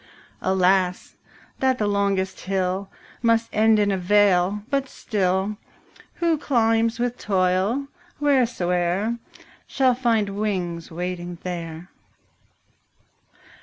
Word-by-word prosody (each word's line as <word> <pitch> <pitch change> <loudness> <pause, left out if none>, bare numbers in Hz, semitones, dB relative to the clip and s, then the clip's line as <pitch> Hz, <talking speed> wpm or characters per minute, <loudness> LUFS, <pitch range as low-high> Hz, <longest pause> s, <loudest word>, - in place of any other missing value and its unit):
20 190 - 0
Alas, 185 -1 +1 0.4
that 260 -1 +2
the 215 - 0
longest 200 -2 0
hill 190 0 -2 0.3
Must 230 -1 +2
end 220 0 +4
in 205 -1 +2
a 190 - 0
vale; 200 +1 +3
but 275 -1 0
still, 195 -1 -1 0.6
Who 335 -3 +1
climbs 230 -4 +2
with 245 0 -2
toil, 190 +6 +1 0.3
wheresoe'er, 225 -6 +1 0.5
Shall 260 -2 +2
find 230 -4 +1
wings 185 -5 -3
waiting 175 +1 -5
there. 170 -1 -6
200 Hz, 100 wpm, -23 LUFS, 180-230 Hz, 0.6 s, end